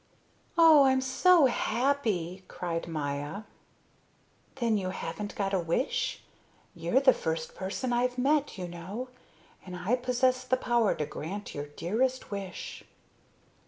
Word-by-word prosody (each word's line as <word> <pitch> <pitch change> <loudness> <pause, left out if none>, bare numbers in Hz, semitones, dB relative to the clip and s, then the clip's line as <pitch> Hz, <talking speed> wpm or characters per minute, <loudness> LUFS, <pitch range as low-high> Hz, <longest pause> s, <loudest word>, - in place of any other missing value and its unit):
"Oh, 320 -4 +8
I'm 265 0 +4
so 290 +5 +5
happy!" 225 -8 0
cried 170 -2 -4
Maya. 145 +4 -3 1.1
"Then 235 -4 +1
you 190 -3 -1
haven't 205 +4 -5
got 200 -4 -1
a 190 - +3
wish? 175 - -1 0.5
You're 170 +10 +1
the 265 -2 +6
first 160 0 -3
person 210 +7 -3
I've 250 +1 +1
met, 285 0 +1
you 180 -1 -4
know, 185 +9 -6 0.5
and 180 -1 -8
I 185 +7 +1
possess 255 0 +1
the 255 0 +1
power 240 -4 +2
to 150 - -2
grant 175 +7 -6
your 145 0 -5
dearest 220 - -1
wish." 195 -2 -6
215 Hz, 130 wpm, -29 LUFS, 175-255 Hz, 1.1 s, Oh